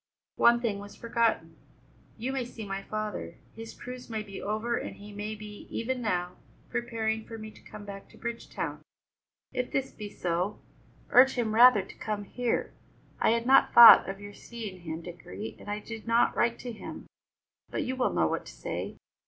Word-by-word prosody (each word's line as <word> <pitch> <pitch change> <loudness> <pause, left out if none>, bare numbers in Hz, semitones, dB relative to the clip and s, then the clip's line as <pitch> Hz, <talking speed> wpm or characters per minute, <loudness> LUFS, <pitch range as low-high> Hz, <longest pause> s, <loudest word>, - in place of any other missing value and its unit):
"One 235 0 +6
thing 215 -4 -1
was 205 0 -10
forgotten: 230 -1 0 0.6
You 250 +4 -3
may 265 -2 -1
see 235 -2 -8
my 195 0 -4
father; 215 +1 -4 0.2
his 225 0 -8
cruise 250 0 -8
may 220 -2 -3
be 200 -2 -8
over 215 +3 -1
and - - -4
he 205 +1 -11
may 210 +1 -4
be, 210 -1 -10
even 250 +2 -2
now, 180 -5 -1 0.3
preparing 225 -2 -1
for 225 - -7
me 215 0 -8
to - - -17
come 210 -1 -11
back 195 -1 -9
to - - -17
Bridgetown. 235 0 -4 0.7
If 250 0 -2
this 270 0 -1
be 210 -2 -7
so, 180 +1 -2 0.5
urge 265 +1 +7
him 230 -3 0
rather 235 -3 +7
to - - -13
come 210 -1 -3
here. 240 +4 -2 0.5
I - - +3
had 230 +1 +2
not 270 +2 +5
thought 235 -4 +11
of 195 0 -5
your 205 0 -9
seeing 215 -4 -8
him, 160 0 -5
Dickory, 110 - -8
and - - -10
I 205 - -1
did 220 +1 -8
not 230 +1 +3
write 235 0 +2
to 245 - -5
him, 220 - -8 0.6
but - - -2
you 260 - -2
will 260 - +1
know 85 -2 +2
what 80 - -2
to - - -8
say. - - -5
220 Hz, 190 wpm, -29 LUFS, 200-235 Hz, 0.7 s, thought